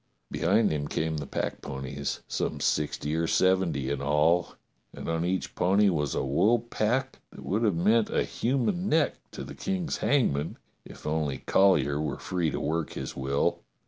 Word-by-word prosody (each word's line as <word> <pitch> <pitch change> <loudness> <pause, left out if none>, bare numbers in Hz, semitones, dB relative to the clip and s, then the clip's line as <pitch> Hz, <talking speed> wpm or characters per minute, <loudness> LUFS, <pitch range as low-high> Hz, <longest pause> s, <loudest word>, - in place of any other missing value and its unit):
Behind 110 -1 +2
him 75 -1 -2
came 80 +1 -1
the 70 -2 -5
packponies, 65 +2 -4
some - - -2
sixty 75 0 0
or 80 +1 0
seventy 95 -9 +2
in 70 -1 -2
all, 75 +5 +2 0.4
and - - -7
on 80 0 0
each 90 +2 -1
pony 100 +3 +3
was 75 -6 -1
a - - 0
wool 100 - +3
pack 120 +3 -1
that - - -12
would 105 +4 0
have 105 -6 +2
meant 105 +6 +3
a - - +1
human 140 - -1
neck 155 -2 +2
to - - -7
the - - -8
King's 185 -4 -2
hangman 80 - +1 0.3
if - - -13
only 75 -4 -1
Colly 95 -1 +4
er 70 +1 -1
were 75 - -2
free 90 -3 -1
to - - -3
work 80 +1 -2
his - - -5
will. 70 +1 0
85 Hz, 175 wpm, -28 LUFS, 75-110 Hz, 0.4 s, Colly